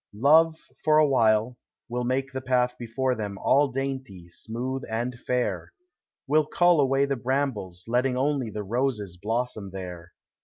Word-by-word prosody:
Love, 160 +6 +5 0.3
for 155 -1 +4
a 155 -1 +6
while, 115 -2 +2 0.3
will 125 +1 -2
make 130 +2 -1
the 130 0 -4
path 125 -1 +1
before 125 +2 -1
them 105 -4 -4
All 140 +7 +3
dainty, 130 -9 -5
smooth, 125 +8 -4
and 120 +3 -2
fair, 115 -9 -2 0.3
— - - -67
Will 150 +1 +3
cull 175 -1 +4
away 135 0 +3
the 140 0 -1
brambles, 120 -9 -2
letting 125 +2 +1
only 135 -3 0
The 105 -1 -5
roses 105 -5 -2
blossom 115 -2 -2
there. 90 -3 -8
125 Hz, 155 wpm, -26 LUFS, 110-135 Hz, 0.3 s, a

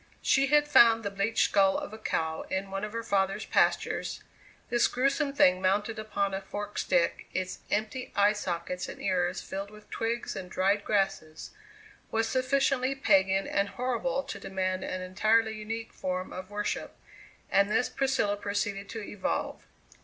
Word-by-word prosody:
She 275 0 +4
had 295 +1 +4
found 230 -5 +6
the 200 - -2
bleached 200 +3 +1
skull 195 -1 +4
of - - -6
a - - -7
cow 160 -6 -1
in 190 +1 -2
one 195 +1 -3
of 210 - -3
her 230 +1 -4
father's 195 -1 0
pastures; - - +1 0.5
this 240 0 +4
gruesome 275 +3 +1
thing 185 -10 +4
mounted 205 +4 +1
upon 205 -2 -1
a 195 - -2
forked 205 +1 -5
stick, - - +1
its 185 0 -2
empty 220 +5 -2
eye 205 +1 +5
sockets 180 -3 -3
and - - -8
ears 180 -1 0
filled 195 +1 -5
with 210 0 -16
twigs 230 +1 -2
and 180 -1 -6
dried 195 +2 +1
grasses, 195 -7 -1 0.6
was 225 0 0
sufficiently 265 0 +1
pagan 195 -6 +3
and 200 0 0
horrible 255 +2 -1
to 200 - -7
demand 185 -1 -2
an 185 0 -4
entirely 220 +4 +2
unique 220 +1 -5
form 185 0 -3
of 185 +1 -7
worship, 205 0 -3 0.6
and 200 +1 +4
this 250 - +2
Priscilla 265 -7 0
proceeded 200 0 -2
to 225 -2 -5
evolve. 205 -1 -3
205 Hz, 160 wpm, -29 LUFS, 190-230 Hz, 0.6 s, found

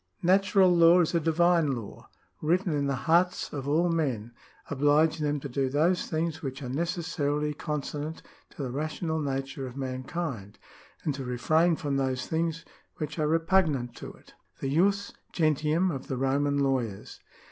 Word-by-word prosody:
— - - -50
" - - -42
Natural 195 -2 +4
law 170 +1 +7
is 165 - 0
a 170 - +3
divine 165 -1 +3
law, 115 -4 -9 0.3
written 175 +2 +1
in 140 -1 0
the 140 - 0
hearts 175 +2 +2
of 140 -2 -4
all 160 +5 +2
men, 130 -10 -1 0.4
obUging 145 +3 +3
them 150 -1 0
to 140 - -5
do 135 0 -1
those 160 +6 +1
things 160 0 -2
which 135 -2 -5
are 125 - -5
necessaril}'' 150 -1 -1
consonant 150 +1 -4 0.3
to 145 - -7
the 125 - -3
rational 155 +3 -2
nature 135 -2 -3
of 125 +1 -10
mankind, 130 - -4 0.5
and 150 - 0
to 135 0 -5
refrain 155 +7 +2
from 145 -3 -2
those 130 -1 -1
things 165 0 -2 0.3
which 155 +1 -5
are 150 - +2
repugnant 160 -6 +1
to - - -8
it." - - -20 0.2
^ - - -31
The 135 0 -2
Jus 200 +5 +2 0.2
Gentium 155 +2 +2
of 135 -4 -6
the 130 - -3
Roman 140 +2 +1
Lawyers. 130 -7 -1
150 Hz, 170 wpm, -28 LUFS, 135-165 Hz, 0.5 s, law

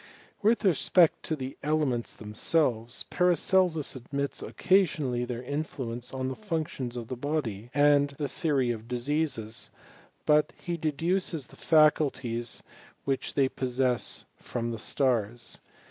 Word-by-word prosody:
With 225 +1 +3
respect 175 -1 +4
to 160 - 0
the 130 -2 -6
elements 145 -6 0
themselves, 115 +2 0
Paracelsus 180 -3 +2
admits 140 +3 -3
occasionally 155 -10 +2
their 120 0 -5
influence 125 -4 -4
on 130 -1 -2
the 130 - -3
functions 155 - -3
of 115 -2 -5
the 130 - -4
body, 120 -6 -3
and 145 0 +4
the 145 - -1
theory 140 -3 +1
of 115 -1 -6
diseases; 125 -2 -1 0.6
but 150 0 +4
he 175 - -3
deduces 165 0 0
the - - -16
faculties 140 -7 +2 0.4
which 135 -1 -1
they 135 -2 +4
possess 130 -1 -1
from 120 -1 -3
the 115 - -5
stars. 120 -2 0
135 Hz, 125 wpm, -28 LUFS, 120-155 Hz, 0.6 s, respect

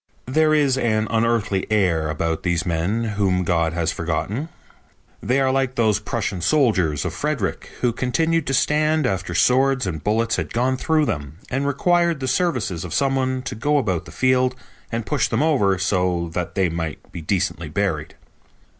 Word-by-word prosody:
There 155 +4 +3
is 140 -3 +2
an 110 -3 +1
unearthly 115 -4 +1
air 85 -7 +2
about 80 +1 -2
these 85 -1 0
men 90 +7 0
whom 100 -4 0
God 85 -2 +1
has 85 -1 0
forgotten. 95 - -3 0.7
They 125 +6 +1
are 135 -1 +2
like 135 -1 0
those 110 -3 +2
Prussian 105 -4 -3
soldiers 95 - +2
of 90 - -2
Frederick 140 - -2
who 120 -2 +2
continued 160 +6 0
to 135 - 0
stand 155 +2 +2
after 95 -6 -2
swords 130 0 +3
and 80 -6 -4
bullets 115 +4 +1
had - - -4
gone 125 +2 +1
through 155 +3 +1
them 75 - -4
and 135 +2 0
required 170 +2 +2
the 130 - -3
services 125 - 0
of 90 - -5
some 135 -1 +2
one 130 -1 -1
to - - -4
go 145 +7 +1
about 95 - -1
the - - -11
field 130 0 +2 0.4
and 115 -1 -2
push 145 -2 +1
them 115 +6 0
over 105 -12 +2
so 90 -3 0
that 90 -1 -3
they 95 -2 +2
might 80 -3 -5
be 85 - -7
decently 90 +4 -1
buried. - - -2
115 Hz, 175 wpm, -22 LUFS, 90-135 Hz, 0.7 s, There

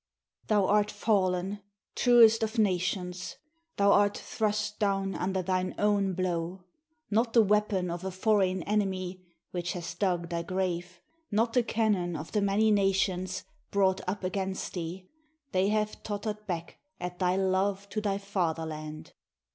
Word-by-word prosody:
] - - -39
Thou 205 -3 +3
art 210 +1 +3
fallen, 195 -2 0 0.3
truest 230 -2 +6
of 220 +2 -2
nations! 180 -2 0 0.4
Thou 200 0 +5
art 205 0 +4
thrust 210 -1 -2
down 195 -2 +1
under 190 0 -1
thine 185 0 -1
own 200 -2 +2
blow! 180 0 -2 0.5
not 225 +2 +2
the 230 - +7
weapon 205 -3 +1
of 175 +1 -5
a 190 - -2
foreign 190 -1 +1
enemy, 190 -3 -1 0.3
which 175 -1 -2
has 175 -1 -5
dug 175 -2 -1
thy 170 -1 -1
grave; 180 0 -3 0.3
not 225 +2 +1
the 250 - +4
cannon 210 -7 0
of 155 +1 -6
the 210 - +1
many 200 +2 +3
nations, 190 -2 +1 0.3
brought 190 -1 +2
up 200 +1 -3
against 190 +1 -3
thee 180 +1 -5 0.2
— 310 -2 -47
they 185 +1 +2
have 215 0 -1
tottered 210 0 -4
back 170 -3 -4 0.2
at 180 0 -5
thy 180 -1 +2
Love 195 +1 +1
to 215 - -2
thy 200 -2 0
Fatherland! 160 -6 -3
195 Hz, 150 wpm, -29 LUFS, 180-210 Hz, 0.5 s, the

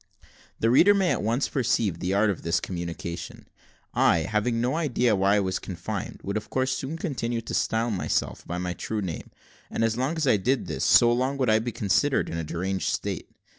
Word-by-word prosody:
The 115 - +2
reader 195 +11 +6
may 190 -3 +2
at - - 0
once 115 +6 0
perceive 110 - 0
the 90 - -2
art 100 +2 +3
of 95 - -6
this 85 +1 +1
communication: 85 -1 -6 0.5
I, 85 - +4
having 110 +5 0
no 125 +4 0
idea 125 -8 +2
why 100 +1 +3
I - - +4
was 95 -1 -1
confined, 85 -4 -5
would 100 +2 -2
of 105 - -6
course 130 0 0 0.2
continue 120 -9 -2
to - - -7
style 115 +1 0
myself 95 - -1
by 90 - -3
my 90 0 -2
true 105 +3 -3
name; 85 -4 -5 0.4
and - - -1
as 115 0 +1
long 130 +6 0
as 160 - 0
I 120 -5 +4
did 125 +7 0
this, - - -3
so 120 -1 +6
long 130 +3 0
would 130 -5 +2
I 110 - +4
be 120 +2 -3
considered 115 +8 +1
in 80 - -4
a - - -2
deranged 95 +4 -2
state. - - -3
110 Hz, 210 wpm, -26 LUFS, 95-125 Hz, 0.5 s, reader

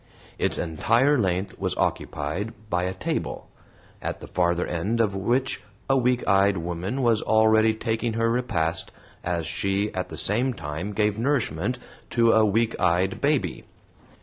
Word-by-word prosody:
Its - - 0
entire 115 - +2
length 95 -1 -1
was - - -2
occupied 85 +10 -2 0.2
by 90 0 +1
a 90 - -2
table, - - -3 0.5
at - - -4
the - - -9
farther 85 -1 0
end 100 +7 -1
of 105 -4 +2
which 120 +7 0 0.3
a 135 - +3
weak 125 -1 +1
eyed 100 0 +4
woman 90 +10 -3
was 115 -3 +3
already 110 0 +4
taking 115 0 -1
her 115 +1 +1
repast 90 -9 0 0.3
as 85 -2 -1
she 100 +5 -1
at 90 - -3
the - - -7
same 125 +6 +1
time 80 +6 -5
gave 105 0 0
nourishment 120 - 0 0.3
to 115 -1 +4
a 110 - +5
weak 110 +2 +2
eyed 90 +1 +1
baby. 140 - 0
105 Hz, 150 wpm, -25 LUFS, 90-115 Hz, 0.5 s, a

